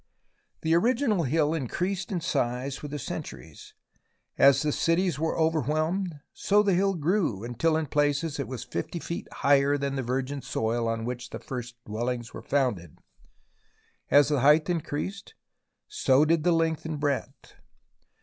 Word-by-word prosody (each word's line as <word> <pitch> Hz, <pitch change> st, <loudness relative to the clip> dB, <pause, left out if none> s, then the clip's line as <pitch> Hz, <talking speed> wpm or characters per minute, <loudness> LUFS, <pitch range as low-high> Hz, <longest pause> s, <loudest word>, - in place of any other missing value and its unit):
The 160 Hz, 0 st, +1 dB
original 220 Hz, -, +2 dB
hill 150 Hz, +3 st, +1 dB
increased 180 Hz, -, -2 dB
in 180 Hz, -3 st, -1 dB
size 130 Hz, -2 st, -2 dB
with 150 Hz, -, -6 dB
the 150 Hz, -, -4 dB
centuries. 60 Hz, -, -8 dB, 0.6 s
As 140 Hz, +2 st, +5 dB
the 150 Hz, -, +1 dB
cities 165 Hz, 0 st, +1 dB
were 160 Hz, +1 st, -1 dB
overwhelmed, 160 Hz, -, 0 dB
so 205 Hz, +1 st, +3 dB
the 200 Hz, -2 st, +2 dB
hill 195 Hz, +2 st, +2 dB
grew 160 Hz, -, 0 dB
until 155 Hz, +7 st, 0 dB
in 160 Hz, -, -1 dB
places 145 Hz, +1 st, 0 dB
it 140 Hz, -, -2 dB
was 130 Hz, -4 st, -6 dB
50 85 Hz, -, -4 dB
feet 170 Hz, 0 st, -5 dB
higher 140 Hz, 0 st, +3 dB
than 140 Hz, -1 st, -2 dB
the -, -, 0 dB
virgin 130 Hz, +3 st, -2 dB
soil 115 Hz, 0 st, -1 dB
on 115 Hz, 0 st, -2 dB
which 125 Hz, 0 st, -5 dB
the -, -, -6 dB
first 125 Hz, -2 st, -6 dB
dwellings 120 Hz, +2 st, -3 dB
were -, -, -7 dB
founded. 115 Hz, -, -1 dB, 1.1 s
As 145 Hz, 0 st, +5 dB
the 145 Hz, -2 st, +2 dB
height 150 Hz, +5 st, +4 dB
increased, 175 Hz, +4 st, -4 dB, 0.5 s
so 145 Hz, -, +3 dB
did 160 Hz, 0 st, +2 dB
the 175 Hz, -, +3 dB
length 165 Hz, -1 st, +1 dB
and 160 Hz, -2 st, -4 dB
breadth. 145 Hz, -2 st, -3 dB
145 Hz, 155 wpm, -27 LUFS, 130-165 Hz, 1.1 s, As